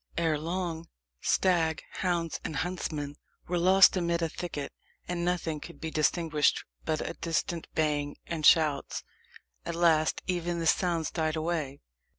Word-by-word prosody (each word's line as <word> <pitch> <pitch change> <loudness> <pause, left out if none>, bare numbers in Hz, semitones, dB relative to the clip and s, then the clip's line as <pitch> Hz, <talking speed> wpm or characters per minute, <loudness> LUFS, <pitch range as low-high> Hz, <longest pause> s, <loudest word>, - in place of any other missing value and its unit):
Ere 160 -3 +1
long, 170 0 -3 0.3
stag, 165 -5 +2 0.2
hounds, 175 -3 0
and 155 - -4
huntsmen 155 -3 -3 0.3
were 175 0 0
lost 190 +3 +7
amid 170 -2 0
a 165 - 0
thicket, 155 -4 -5 0.3
and 175 -1 -2
nothing 170 -3 -1
could 170 - -11
be 160 -1 -4
distinguished 155 -1 +2 0.2
but 155 -1 -1
a - - -4
distant 165 0 -2
baying 145 -2 0
and 165 -2 -4
shouts. 150 -3 +4 0.6
At 170 - -4
last 160 -2 +3
even 175 -1 -1
these 165 -1 +4
sounds 170 -4 -1
died 160 -2 -1
away. 155 -4 -2
165 Hz, 145 wpm, -29 LUFS, 155-175 Hz, 0.6 s, lost